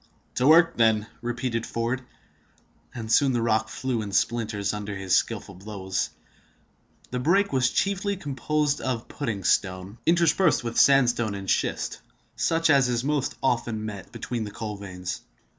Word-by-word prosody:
"To 130 - +1
work, 165 +2 +6
then!" 110 -2 +3 0.2
repeated 120 -1 -2
Ford; 115 +3 -2 0.9
and 110 -2 -5
soon 135 +2 +4
the 120 - +1
rock 110 -1 +1
flew 130 -4 -2
in 105 -2 -5
splinters 105 -1 0
under 105 -1 -5
his 95 -1 -2
skillful 105 -3 -1
blows. 95 0 -3 1.0
The 125 - -2
break 185 +7 +2
was 125 -2 +3
chiefly 200 - 0
composed 145 -1 -1
of 125 -3 -3
pudding 115 -9 -4
stone, 95 +4 0
interspersed 170 -2 +3
with 115 -1 -1
sandstone 120 -6 +4
and 100 -1 -7
schist, - - -1 0.3
such 165 0 +2
as 135 -3 +4
is 120 0 0
most 145 -1 -1
often 115 -4 0
met 100 -3 -6
with - - -27
between 120 0 -4
the 105 - -5
coal 105 0 -5
veins. 95 -2 -6
120 Hz, 155 wpm, -26 LUFS, 105-140 Hz, 1.0 s, work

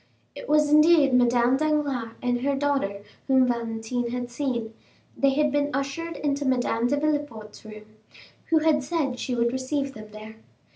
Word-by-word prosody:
It - - -10
was 300 0 +4
indeed 305 -2 +5
Madame 245 +1 +3
Danglars 285 -6 -1
and 245 -1 0
her 280 +1 0
daughter 270 -8 -1 0.2
whom 260 -1 +4
Valentine 235 0 -3
had 245 0 -4
seen; 240 -4 -3 0.4
they 275 - +2
had 300 0 +2
been 290 0 0
ushered 315 +4 -4
into 285 -1 -1
Madame 245 -3 0
de 285 +3 0
Villefort's 290 -8 -3
room, 215 -1 -11 0.6
who 325 - +2
had 310 -2 +3
said 275 -4 -2
she 250 - -3
would 235 0 0
receive 275 +1 -2
them 215 -2 -10
there. 215 +1 -11
260 Hz, 160 wpm, -25 LUFS, 235-290 Hz, 0.6 s, indeed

